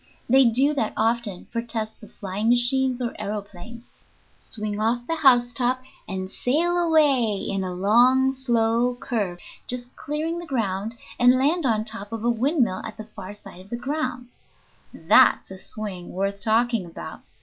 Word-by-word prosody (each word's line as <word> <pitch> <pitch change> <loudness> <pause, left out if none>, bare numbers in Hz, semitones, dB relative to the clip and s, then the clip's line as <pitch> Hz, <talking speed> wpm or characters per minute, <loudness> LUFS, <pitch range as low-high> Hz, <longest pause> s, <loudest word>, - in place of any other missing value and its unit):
They 265 +2 +6
do 260 +6 +3
that 225 -7 -1
often 225 -4 0
for 230 - -1
tests 225 -2 -4
of 215 - -13
flying 200 +3 -2
machines 250 +1 +2
or 235 - -2
aëroplanes 210 +2 -6 0.6
swing 210 -2 -4
off 240 +2 0
the 330 +3 -2
housetop, 250 -2 +3 0.2
and 190 -1 -5
sail 325 +11 0
away 295 -10 +3
in 195 -1 -2
a 185 - -3
long, 240 +8 +4
slow 240 -2 +1
curve, 205 -9 -2 0.3
just 245 0 -4
clearing 315 +3 -3
the 345 - -8
ground, 220 -4 -2 0.2
and 245 +1 +6
land 295 +3 +2
on 220 -2 +1
top 205 -1 -2
of 225 -1 -5
a 240 - +3
windmill 245 - +1
at 220 -2 -7
the 215 - -7
far 205 -2 -9
side 195 -3 -12
of 190 - -17
the 235 - -3
grounds. 255 -2 -5 0.4
That's - - +4
a 190 - -8
swing 190 -4 -6
worth 195 +1 -2
talking 230 -1 +2
about! 165 - -9
235 Hz, 160 wpm, -24 LUFS, 210-255 Hz, 0.6 s, They